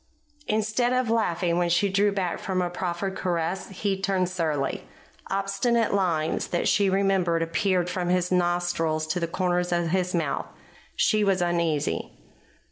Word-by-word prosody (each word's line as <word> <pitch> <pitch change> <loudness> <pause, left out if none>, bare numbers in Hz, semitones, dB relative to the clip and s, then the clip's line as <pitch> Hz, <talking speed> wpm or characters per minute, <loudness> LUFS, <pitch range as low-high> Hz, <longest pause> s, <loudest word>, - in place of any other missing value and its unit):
Instead 220 +3 +1
of 255 -2 +1
laughing 175 -6 +1
when 175 -1 +1
she 175 +4 +3
drew 200 +1 +2
back 190 -3 -2
from 190 -1 -2
a 175 -1 -1
proffered 180 +2 -3
caress, 175 0 -2
he 195 0 -2
turned 190 -2 +1
surly. 155 -6 -1 0.5
Obstinate 195 +4 +1
lines 170 -5 0
that 175 - -1
she 200 -1 +3
remembered 190 -4 +2
appeared 180 +1 0
from 180 -1 -2
his 180 0 +1
nostrils 175 -3 +1
to 155 +3 -2
the 170 - -1
corners 180 0 0
of 175 -1 +1
his 180 +1 0
mouth. 160 -5 -1 0.5
She 215 -1 +2
was 195 -2 +2
uneasy. 170 -4 0
180 Hz, 150 wpm, -26 LUFS, 170-195 Hz, 0.5 s, she